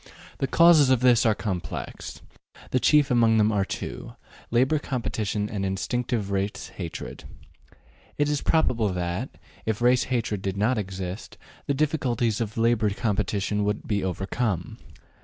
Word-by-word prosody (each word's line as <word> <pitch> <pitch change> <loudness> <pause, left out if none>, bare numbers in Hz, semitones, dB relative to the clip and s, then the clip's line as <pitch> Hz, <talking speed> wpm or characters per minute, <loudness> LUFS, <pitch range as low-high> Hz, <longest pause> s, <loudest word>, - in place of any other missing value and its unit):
The 135 - 0
causes 165 -2 +6
of 130 -2 +3
this 120 -2 +5
are 110 - +3
complex; 95 -6 -5 0.5
the 130 - +2
chief 150 +1 +4
among 115 -2 +4
them 105 0 +4
are 100 -2 +1
two, - - -6 0.4
labor 130 +6 +2
competition 110 -6 -2
and 100 -2 -4
instinctive 100 +2 -2
race 100 +1 -2
hatred. 85 -4 -6 0.9
It 145 - +2
is 145 -1 0
probable 120 -9 +2
that, 90 +7 -3 0.4
if 110 -2 0
race 125 +1 +3
hatred 115 -5 -1
did 95 0 -3
not 110 +4 +2
exist, 95 -1 -6 0.3
the 140 - +1
difficulties 125 -7 0
of 105 -1 -4
labor 115 -2 +2
competition 105 0 -1
could 105 +1 -2
be 100 -2 0
overcome. 95 +1 -2
110 Hz, 140 wpm, -25 LUFS, 100-125 Hz, 0.9 s, causes